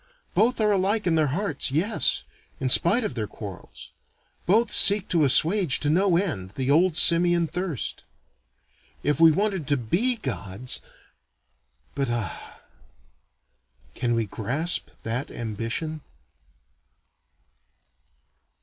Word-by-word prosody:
Both 240 +3 +1
are 210 -1 +2
alike 200 +2 0
in 175 - +1
their 155 -2 +2
hearts, 160 +1 -3
yes, 170 +11 0 0.4
in 130 - -2
spite 205 - +3
of 215 - -3
their 110 -3 -4
quarrels. 100 -2 -11 0.6
Both 220 +5 +2
seek 205 -1 +5
to 165 -4 +2
assuage 160 +3 +3
to 150 - 0
no 180 +1 +2
end, 105 - -4
the 135 +1 -1
old 165 +2 +2
simian 170 +1 +5
thirst. 170 - -4 1.0
If 145 +1 0
we 165 0 +7
wanted 195 -2 -2
to 145 -1 +1
be 185 - 0
Gods 125 - -3 1.1
but 140 -3 -2
ah, 115 -6 -6 1.3
can 120 -2 -2
we 115 -1 -1
grasp 135 - -3
that 115 +4 -4
ambition? 115 +8 -5
155 Hz, 115 wpm, -24 LUFS, 125-190 Hz, 1.3 s, we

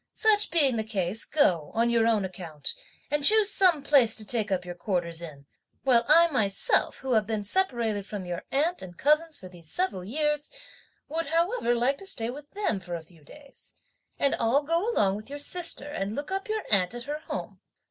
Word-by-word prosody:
Such 425 -1 +4
being 285 -7 +2
the 220 - -1
case, 205 -1 -1
go, 180 - +1
on 235 +1 +2
your 230 -1 +2
own 215 -4 +1
account, 165 -6 -6 0.4
and 295 -1 0
choose 425 +4 +7
some 350 -8 +4
place 265 -6 +4
to 215 - +1
take 215 -2 0
up 180 -1 -1
your 175 - -6
quarters 175 -2 -3
in, 145 -4 -10 0.4
while 240 -3 +3
I 330 +3 +6
myself, 200 -7 +1
who 265 -1 -5
have 215 -3 +2
been 215 -2 -2
separated 225 - 0
from 205 -4 -6
your 175 -1 -5
aunt 320 +6 0
and 175 -2 -11
cousins 305 +2 +1
for 185 - -10
these 175 -3 -11
several 360 - -1
years, 295 +7 -1 0.6
would 325 +2 -3
however 335 - 0
like 255 +4 0
to 390 - -6
stay 235 -11 0
with 290 +2 -11
them 400 - -2
for 175 -1 -6
a 165 - -7
few 160 -2 -20
days; 280 - -11 0.4
and 280 - +1
I'll 250 +6 +2
go 335 +9 0
along 195 - +1
with 215 +4 -11
your 285 - -6
sister 290 -1 +1
and 200 -5 -4
look 290 +5 -6
up 390 +2 -3
your 435 -1 -2
aunt 195 +1 +2
at 240 - -6
her 295 +3 -5
home. - - -6
240 Hz, 205 wpm, -27 LUFS, 195-300 Hz, 0.6 s, choose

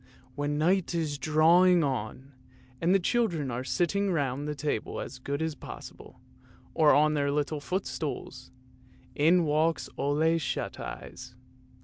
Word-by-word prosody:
When 145 +2 -2
night 175 +3 +1
is 155 -4 -2
drawing 165 +4 +5
on, 130 0 -4 0.5
and 170 - +2
the 195 - +6
children 175 - 0
are 120 +2 -3
sitting 195 +7 0
round 145 -3 -1
the 150 - -3
table 145 +1 -3
as 130 - -7
good 140 +4 -3
as 160 -1 -2
possible, 145 - -11 0.5
or 155 -2 +5
on 155 +1 +4
their 140 -1 0
little 150 +1 -1
footstools, 160 -1 -4 0.6
in 170 +4 +4
walks 155 +1 +1
Ole 160 +4 +2
Shut 150 - -3
eyes. 130 -1 -8
150 Hz, 135 wpm, -28 LUFS, 140-165 Hz, 0.6 s, the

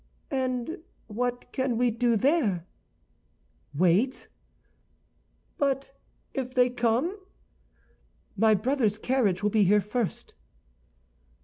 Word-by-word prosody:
"And 260 +4 -2 0.3
what 245 +3 -3
can 260 -3 -1
we 245 0 +2
do 235 +1 +1
there?" 230 - +1 1.1
"Wait." 185 - +1 1.3
"But 275 -1 -1 0.4
if 255 -1 -4
they 250 -1 +4
come?" 245 - 0 1.2
"My 215 +1 +4
brother's 225 -1 0
carriage 215 -6 0
will 210 - +2
be 210 -2 +4
here 205 +3 +5
first." 210 +1 -3
245 Hz, 95 wpm, -27 LUFS, 210-260 Hz, 1.3 s, here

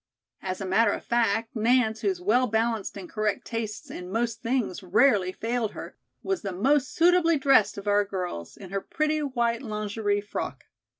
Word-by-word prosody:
As 185 -1 -4
a 195 - -4
matter 205 +3 +3
of - - -6
fact, 225 0 0
Nance, 225 0 +2
whose 195 -4 0
well 230 +8 +2
balanced 225 -2 -1
and 190 -2 -8
correct 215 0 -2
tastes 225 -2 -5
in 180 0 -7
most 230 +1 -1
things 230 -6 -1
rarely 195 0 +3
failed 225 +2 -2
her, - - -8 0.3
was 385 -2 -1
the 200 - -4
most 260 +9 +2
suitably 335 -1 +4
dressed 270 -8 +4
of 200 +1 -7
our 205 0 +4
girls, 180 - -5
in 190 - -11
her 195 0 -2
pretty 310 +5 -1
white 240 -5 0
lingerie 210 -1 -1
frock. 205 - -5
220 Hz, 175 wpm, -26 LUFS, 200-245 Hz, 0.3 s, suitably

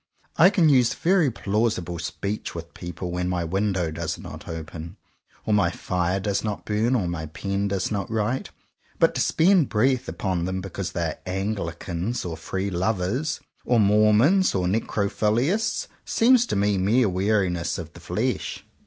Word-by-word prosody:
I 175 +4 +7
can 180 -5 +3
use 130 -5 +4
very 175 -4 +3
plausible 100 -6 -1
speech 100 +5 -4
with 85 0 -7
people 85 +1 -6
when 90 0 -1
my 90 -1 -1
window 95 -1 0
does 80 - -3
not - - -10
open, 80 +2 -7 0.5
or 110 - +1
my 100 -4 +4
fire 90 +2 -1
does 100 0 -1
not 105 -2 -4
burn, 110 +4 +1
or 100 -8 0
my 80 -2 -4
pen 100 +5 -2
does 100 +1 -1
not 100 -2 -2
write. 110 +3 -1 0.5
But - - +4
to - - -1
spend 175 -3 +4
breath 130 +3 +1
upon 90 -4 -2
them 95 +1 -2
because 95 0 -5
they 85 - -1
are 80 - -3
Anglicans, 95 +1 -3
or 85 -2 -3
Free 95 +4 -3
Lovers, 100 - -1 0.2
or 120 -2 +2
Mormons, 105 - +4
or 90 -2 +1
Necrophiliasts, 110 - 0 0.2
seems 245 +1 +4
to - - -1
me 100 -1 +2
mere 110 +6 +3
weariness 95 -2 0
of - - -7
the - - -12
flesh. - - -2
100 Hz, 160 wpm, -24 LUFS, 90-115 Hz, 0.5 s, I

